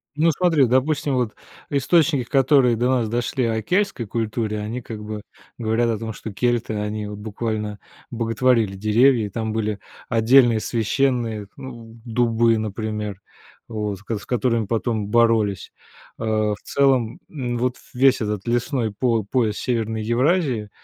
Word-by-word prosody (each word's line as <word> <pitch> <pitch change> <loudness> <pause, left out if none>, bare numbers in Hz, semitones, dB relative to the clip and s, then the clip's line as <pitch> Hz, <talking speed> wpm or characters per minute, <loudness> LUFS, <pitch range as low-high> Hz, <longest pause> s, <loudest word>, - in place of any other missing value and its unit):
Ну, 160 +2 +3
смотри, 160 -4 +3
допустим, 135 +3 +1
вот 120 -4 0 0.4
источники, 145 -1 +3
которые 135 -3 +4
до 120 +2 +1
нас 120 -4 +1
дошли 120 +2 -1
о 110 -1 0
кельтской 185 - 0
культуре, 110 0 -2
они 115 +4 -4
как 110 -2 -8
бы 105 0 -6 0.3
говорят 115 0 +1
о 110 - 0
том, 110 0 -5
что 110 - -7
кельты- 120 +1 0
они 105 0 -3
вот 105 0 -7
буквально 105 -1 -4 0.3
боготворили 115 -2 +1
деревья, 110 +3 +3
и - - -5
там 110 +1 -3
были 110 -2 -2 0.3
отдельные 120 0 +5
священные, 115 -2 0
ну, 115 -4 -10
дубы, 115 -1 +2
например, 105 -2 -4 0.5
вот, 105 -3 -3
с - - -17 0.2
с - - -13
которыми 120 -3 0
потом 110 -2 -1
боролись. 110 -3 +2 0.5
Э, - - -4
в 110 -1 +1
целом, 130 -5 +1
н 125 -5 -3
вот 125 +1 -1 0.2
весь 130 +1 +4
этот 105 -1 -2
лесной 120 -1 0
по 115 -1 +1
пояс 110 -1 0
Северной 110 -3 -1
Евразии, 125 - +1
115 Hz, 145 wpm, -22 LUFS, 110-125 Hz, 0.5 s, отдельные